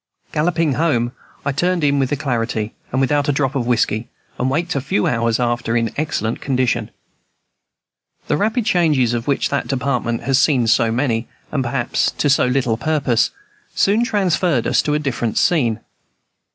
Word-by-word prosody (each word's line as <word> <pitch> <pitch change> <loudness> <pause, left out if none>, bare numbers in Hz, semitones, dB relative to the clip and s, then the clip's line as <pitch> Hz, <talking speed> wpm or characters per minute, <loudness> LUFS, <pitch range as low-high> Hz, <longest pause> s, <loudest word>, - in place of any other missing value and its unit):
Galloping 160 -1 +1
home, 130 -6 +1 0.3
I 140 - +1
turned 175 +4 0
in 140 -1 +3
with 130 -2 0
alacrity, 115 -6 -2 0.2
and 130 - 0
without 145 +2 +1
a - - +5
drop 135 -1 0
of 125 -4 -2
whiskey, 115 -2 +1 0.3
and 130 - +1
waked 165 +5 -1
a 140 - -1
few 105 -6 0
hours 115 -1 +1
after 120 -1 0
in 115 -2 -1
excellent 145 -7 -2
condition. 125 -4 0 1.4
The - - 0
rapid 220 +7 0
changes 150 - +2
of 120 +1 -3
which 140 - +1
that - - -1
Department 125 -2 -1
has 135 -1 +2
seen 135 -7 +3
so 115 0 +3
many 120 -1 0 0.2
and, 140 -3 0
perhaps, 120 -1 0
to 145 - +2
so 135 - +3
little 125 -3 +1
purpose 135 -3 +1 0.5
soon 210 +4 +3
transferred 180 - +1
us - - +3
to 150 - 0
a - - +3
different 130 -6 -2
scene. 120 -10 +2
135 Hz, 165 wpm, -19 LUFS, 120-150 Hz, 1.4 s, a